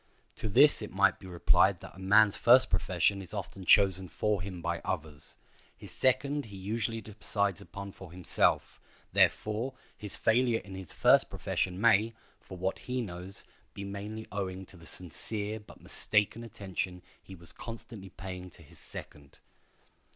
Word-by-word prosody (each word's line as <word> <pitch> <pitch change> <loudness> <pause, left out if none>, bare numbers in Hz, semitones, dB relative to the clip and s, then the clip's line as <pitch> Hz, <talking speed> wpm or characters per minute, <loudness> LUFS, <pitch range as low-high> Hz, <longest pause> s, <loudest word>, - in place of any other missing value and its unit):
To 110 - -3
this 140 +7 +6
it 105 - -5
might 100 +1 +3
be 95 - -11
replied 90 -2 +3
that - - -10
a - - -12
man's 100 +2 +5
first 125 +2 +6
profession 90 +2 +1
is 95 +3 -9
often 95 -1 -6
chosen 95 -2 +5
for 105 +2 0
him 90 -1 -6
by 85 0 -2
others; 75 -5 -5 0.4
his - - -10
second 140 +3 +1
he 100 -3 -10
usually 115 +3 -2
decides 100 -2 -2
upon 100 +3 -8
for 95 -3 -12
himself; 90 -1 +1 0.3
therefore, 115 +5 +2 0.2
his 105 -3 -5
failure 120 +1 +3
in 95 - -11
his 95 -3 -7
first - - +4
profession 90 0 -2
may, 115 0 +4 0.2
for 95 - -11
what 95 +2 -2
he 125 0 -3
knows, 95 -3 -6 0.3
be 100 - -6
mainly 105 +3 -6
owing 95 -2 -4
to 95 - -13
the 85 -2 -11
sincere 105 +6 -2
but 105 - -16
mistaken 105 +2 +1
attention 95 -4 -5 0.2
he 95 - -11
was 85 -1 -13
constantly 115 -4 -9
paying 90 0 -8
to 85 - -16
his 75 - -16
second. 70 -1 -10
100 Hz, 160 wpm, -30 LUFS, 90-110 Hz, 0.4 s, this